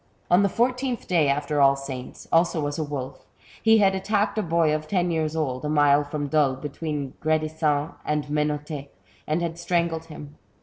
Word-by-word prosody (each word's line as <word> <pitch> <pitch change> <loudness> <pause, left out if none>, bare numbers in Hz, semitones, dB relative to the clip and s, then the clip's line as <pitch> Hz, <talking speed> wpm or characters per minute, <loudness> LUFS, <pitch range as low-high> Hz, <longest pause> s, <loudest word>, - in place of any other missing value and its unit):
On 175 +2 +6
the 200 - +3
fourteenth 250 +3 0
day 165 -5 +3
after 145 +1 0
All 135 0 +6
Saints, 135 -2 -8
also 165 -2 +2
as 145 +2 -3
a - - 0
wolf, 140 -3 -6 0.4
he 225 0 +5
had 195 -2 +4
attacked 205 +2 0
a 215 - +1
boy 165 -3 +2
of 155 0 -3
ten 175 -1 0
years 160 -1 -1
old, 130 -5 -2
a 150 - -2
mile 145 -1 +4
from 145 0 -4
Dole, 145 -3 +2
between 145 0 -5
Gredisans 155 -1 0
and 150 0 -1
Menot^, 150 -1 -2 0.4
and 155 +3 0
had 170 0 -4
strangled 170 -2 -1
him. 150 -2 -11
155 Hz, 180 wpm, -25 LUFS, 145-170 Hz, 0.4 s, On